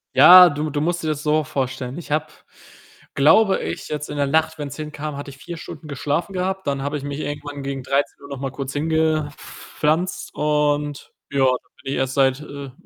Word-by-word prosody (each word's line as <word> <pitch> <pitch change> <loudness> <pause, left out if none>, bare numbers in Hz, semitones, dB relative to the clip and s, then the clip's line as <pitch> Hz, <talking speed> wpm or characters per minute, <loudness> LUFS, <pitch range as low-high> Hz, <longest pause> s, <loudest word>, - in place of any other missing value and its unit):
Ja, 180 0 +10
du 150 +1 -3
du 145 0 -2
musst 170 +1 -1
dir - - -2
das 150 -1 -2
so 155 +1 +2
vorstellen: 130 -1 -3
Ich 170 -3 -9
habe, 155 +1 +1 0.9
glaube 190 +9 +5
ich, 85 +1 -5
jetzt 150 0 -4
in 145 - -5
der 140 -1 +1
Nacht 160 +2 +1
wenn's 140 -2 -5
hinkam, 150 -1 -6
hatte 145 0 -7
ich 135 - -14
4 170 +4 -8
Stunden 155 -1 -9
geschlafen 150 +6 -2
gehabt. 190 +1 -2
Dann 140 -1 -1
habe 145 +2 -2
ich 135 - -8
mich 145 +1 -4
irgendwann 145 -1 -5
gegen 135 -1 -4
13:00 140 +1 -1
noch 140 - -6
mal 135 -1 -3
kurz 135 0 -5
hingepflanzt 155 +2 -1
und 150 -1 0 0.2
ja, 140 - -1
dann 130 -1 0
bin 135 - -4
ich - - -1
erst 130 0 -1
seit, 135 -1 +3
äh, 140 -2 -8
145 Hz, 200 wpm, -22 LUFS, 140-155 Hz, 0.9 s, Ja